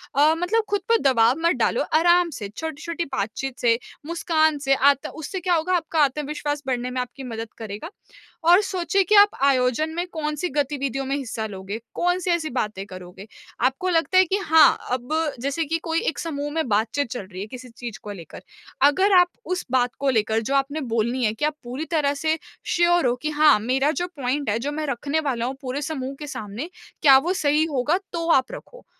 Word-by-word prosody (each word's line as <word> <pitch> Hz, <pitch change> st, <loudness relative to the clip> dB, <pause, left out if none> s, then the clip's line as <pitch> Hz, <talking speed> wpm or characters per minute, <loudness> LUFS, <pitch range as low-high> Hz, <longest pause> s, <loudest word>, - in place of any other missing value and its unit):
अ, 295 Hz, +3 st, +5 dB
मतलब 390 Hz, +7 st, +1 dB
खुद 410 Hz, -1 st, 0 dB
पर 460 Hz, -, +5 dB
दबाव 230 Hz, +2 st, +3 dB
मत 340 Hz, -, +3 dB
डालो, -, -, +1 dB, 0.2 s
आराम 345 Hz, +1 st, +4 dB
से, 210 Hz, -8 st, -6 dB
छोटी-छोटी 320 Hz, +7 st, -5 dB
बातचीत 245 Hz, +2 st, -4 dB
से, 230 Hz, -1 st, +3 dB, 0.3 s
मुस्कान 315 Hz, -2 st, +1 dB
से 275 Hz, -1 st, +2 dB
आत 280 Hz, 0 st, +3 dB
उससे 320 Hz, +5 st, -5 dB
क्या 360 Hz, 0 st, 0 dB
होगा, 335 Hz, +3 st, 0 dB
आपका 330 Hz, -2 st, -1 dB
आत्मविश्वास 295 Hz, +1 st, -2 dB
बढ़ने 250 Hz, -1 st, -1 dB
में 250 Hz, 0 st, -1 dB
आपकी 250 Hz, +2 st, -8 dB
मदद 225 Hz, -3 st, -6 dB
करेगा 215 Hz, +7 st, -7 dB, 0.6 s
और 355 Hz, +3 st, +7 dB
सोचिए 390 Hz, 0 st, 0 dB
कि 425 Hz, +4 st, +2 dB
आप 410 Hz, 0 st, +8 dB
आयोजन 265 Hz, +2 st, +2 dB
में 350 Hz, +1 st, -1 dB
कौन-सी 305 Hz, +1 st, -2 dB
गतिविधियों 275 Hz, -2 st, -1 dB
में 270 Hz, +1 st, -1 dB
हिस्सा 235 Hz, -5 st, -4 dB
लोगे, 200 Hz, +1 st, -6 dB, 0.2 s
कौन-सी 355 Hz, +1 st, 0 dB
ऐसी 330 Hz, -2 st, 0 dB
बातें 210 Hz, -5 st, -2 dB
करोगे। 185 Hz, +2 st, -11 dB, 0.4 s
आपको 265 Hz, +8 st, 0 dB
लगता 340 Hz, +2 st, +2 dB
है 375 Hz, -, +7 dB
कि 380 Hz, +3 st, 0 dB
हाँ, 320 Hz, -6 st, +5 dB
अब 250 Hz, +3 st, -2 dB, 0.3 s
जैसे 280 Hz, +5 st, -1 dB
कि 325 Hz, +3 st, -1 dB
कोई 330 Hz, -1 st, 0 dB
एक 320 Hz, -, -6 dB
समूह 290 Hz, -3 st, -4 dB
में 320 Hz, -3 st, -1 dB
बातचीत 225 Hz, +6 st, 0 dB
चल 245 Hz, -, -3 dB
रही 185 Hz, -, -6 dB
है 205 Hz, -, -5 dB
किसी 255 Hz, +2 st, -10 dB
चीज़ 235 Hz, -3 st, -8 dB
को 210 Hz, -, -6 dB
लेकर। 175 Hz, -5 st, -10 dB, 0.5 s
अगर 380 Hz, +8 st, +2 dB
आप 355 Hz, 0 st, +4 dB, 0.2 s
उस 365 Hz, 0 st, -3 dB
बात 250 Hz, -1 st, +2 dB
को 280 Hz, -, +1 dB
लेकर 220 Hz, -2 st, +1 dB
जो 270 Hz, +5 st, -1 dB
आपने 280 Hz, +3 st, 0 dB
बोलनी 235 Hz, +3 st, 0 dB
है 215 Hz, -, +1 dB
कि 225 Hz, -, -2 dB
आप 305 Hz, 0 st, -1 dB
पूरी 255 Hz, +6 st, -5 dB
तरह 295 Hz, -4 st, +2 dB
से 315 Hz, +3 st, 0 dB, 0.4 s
श्योर 345 Hz, -1 st, +3 dB
हो 240 Hz, -, +1 dB
कि, 305 Hz, -, 0 dB
"हाँ, 300 Hz, -5 st, +5 dB
मेरा 260 Hz, +6 st, +1 dB
जो 355 Hz, -, -1 dB
पॉइंट 275 Hz, +1 st, -1 dB
है, 205 Hz, -, +1 dB
जो 285 Hz, +5 st, -3 dB
मैं 305 Hz, +1 st, -3 dB
रखने 280 Hz, +4 st, -1 dB
वाला 260 Hz, -6 st, -1 dB
हूँ 260 Hz, +2 st, -3 dB
पूरे 265 Hz, +1 st, -4 dB
समूह 275 Hz, -3 st, -4 dB
के 300 Hz, -, -7 dB
सामने, 220 Hz, -, -6 dB, 0.3 s
क्या 275 Hz, -2 st, +8 dB
वो 340 Hz, +7 st, 0 dB
सही 305 Hz, -4 st, +2 dB
होगा?" 285 Hz, +5 st, +1 dB, 0.2 s
तो 335 Hz, -1 st, -2 dB
आप 260 Hz, -4 st, +3 dB
रखो। -, -, -11 dB
285 Hz, 205 wpm, -23 LUFS, 245-325 Hz, 0.6 s, आप